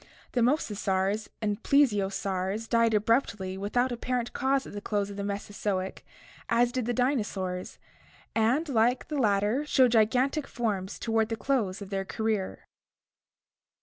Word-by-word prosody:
The 245 - +1
mosasaurs 210 -6 +1 0.2
and 210 +1 -1
plesiosaurs 200 -5 +1
died 230 -1 +3
abruptly 210 -4 +1
without 245 +6 0
apparent 245 0 -2
cause 270 +1 +1
at - - -10
the 205 - -5
close 205 -1 -1
of - - -8
the 200 - -4
Mesozoic, 200 -1 -3 0.5
as 240 +1 +3
did 250 -2 -2
the - - +1
dinosaurs, 210 -8 -1 0.6
and, 240 +9 +2
like 245 -1 +1
the 300 -2 -1
latter, 210 +3 +2
showed 260 -4 +4
gigantic 250 +6 +2
forms 205 -5 -2
toward 225 -1 0
the 225 - -1
close 215 -8 -1
of 200 - -11
their 195 -1 -1
career. 215 -1 -2
220 Hz, 140 wpm, -28 LUFS, 200-245 Hz, 0.6 s, showed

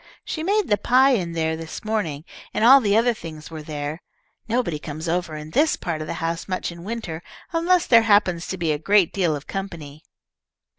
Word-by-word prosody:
"She 315 - -4
made 405 +3 +1
the 205 -2 +2
pie 260 +5 +4
in 180 -9 0
there 160 -1 0
this 160 +5 -8
morning, 180 -10 -2 0.3
and 220 - +2
all 270 +3 +9
the 205 -2 +2
other 235 +1 +3
things 160 -6 -10
were 160 -1 -6
there. 150 +1 -5 0.5
Nobody 225 -10 -1
comes 155 +2 -6
over 170 -1 -1
in 150 0 -8
this 305 - +3
part 165 -3 -4
of 155 - -5
the - - -4
house 165 0 -3
much 185 -2 -3
in 170 0 -11
winter, 195 -6 -5 0.3
unless 345 +2 +2
there 230 -2 +6
happens 205 -6 +2
to 190 - -4
be 165 -3 0
a 150 - -1
great 195 +1 +3
deal 175 -6 +1
of 145 - -8
company." 165 -7 -6
175 Hz, 205 wpm, -23 LUFS, 160-225 Hz, 0.5 s, all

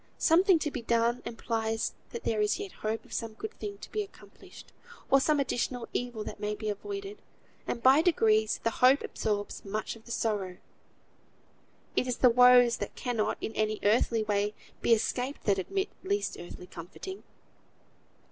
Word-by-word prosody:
Something 360 +2 +5
to 305 -2 -2
be 255 - -4
done 235 +1 +1
implies 225 -1 -2 0.2
that 465 - -7
there 215 -2 0
is 210 - +2
yet 405 -2 -6
hope 220 +1 -4
of - - -13
some 225 -1 -3
good 435 - -6
thing 405 -1 -5
to - - -11
be 425 - -1
accomplished, 405 - -13 0.4
or 275 - +7
some 300 +1 +2
additional 250 -2 -1
evil 245 -3 -3
that - - -7
may 210 0 -2
be 215 0 -4
avoided; 395 - -5 0.5
and 235 - -3
by 270 +4 +7
degrees 220 -10 +3
the 230 - +2
hope 255 +5 +4
absorbs 205 -1 -3
much 215 +3 -3
of 225 - -16
the 235 - -9
sorrow. 205 -6 -1 1.4
It 255 - +1
is 250 - -1
the 250 - +6
woes 245 0 +7
that - - -5
cannot 225 -4 -1
in 225 - -4
any 215 0 0
earthly 220 +1 +3
way 205 0 0 0.3
be - - +1
escaped 250 +4 +1
that 200 -2 +2
admit 385 - -2
least 405 +2 -1
earthly 175 +1 -9
comforting. 190 - -8
235 Hz, 170 wpm, -29 LUFS, 215-285 Hz, 1.4 s, or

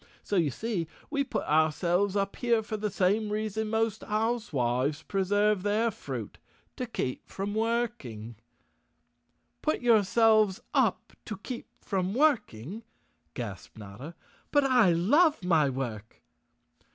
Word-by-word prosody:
So 205 - -2
you 165 -5 +3
see, 190 - -3 0.2
we 280 -2 +1
put - - -3
ourselves 170 +6 +2
up 200 -1 0
here 235 -3 +2
for 215 - -4
the 210 0 -2
same 205 +3 +1
reason 215 +1 -2
most 225 -1 0
housewives 155 - 0
preserve 205 +2 +1
their 215 +3 +1
fruit—to 250 +4 -8
keep 130 - -4
from 200 +1 -4
work¬ 230 0 0
ing." 115 -1 -8 1.3
"Put 310 - 0
yourselves 215 -2 +4
up - - +1
to 215 - -5
keep 240 +4 -7
from 190 0 -2
working," 220 - +1 0.5
gasped 105 -4 -7
Notta. 110 +10 -9 0.3
"But 290 -1 +3
I 245 -8 +5
love 275 - +3
my 160 -5 +3
work!" 120 -5 -5
205 Hz, 125 wpm, -29 LUFS, 160-225 Hz, 1.3 s, I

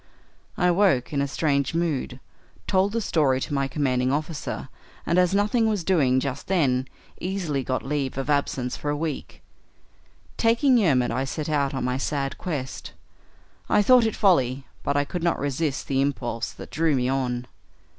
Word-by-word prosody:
I 180 0 +3
woke 175 -9 +2
in 140 - +1
a 140 - 0
strange 140 0 0
mood, 150 -6 -1 0.5
told 190 +1 +2
the 230 +1 -1
story 145 -9 +2
to 145 - -4
my 140 -1 +1
commanding 130 -2 0
officer, 155 +1 -3 0.4
and, 170 +2 +2
as 180 +1 +3
nothing 210 +3 +2
was 205 -5 -1
doing 145 -8 +3
just 140 0 -4
then, 135 -9 +1 0.3
easily 175 -7 -2
got 130 0 -2
leave 135 -1 -2
of 135 -1 -3
absence 140 -4 0
for 145 - -4
a 145 - 0
week. 155 -2 -5 0.9
Taking 240 +3 +4
Yermid, 135 - +2
I 130 +3 -1
set 150 +3 -4
out 140 -2 0
on 135 - -2
my 125 +1 -1
sad 135 -1 -2
quest. 145 -8 -5 0.8
I 210 - +4
thought 245 +1 +6
it 220 - -3
folly, 135 - +2 0.2
but 140 - 0
I 145 - +2
could 175 +4 -4
not 170 0 +1
resist 145 0 -2
the 135 -1 +1
impulse 125 -4 -2
that - - -11
drew 160 -2 +2
me 125 -1 +1
on. 125 -2 -1
145 Hz, 175 wpm, -25 LUFS, 130-175 Hz, 0.9 s, thought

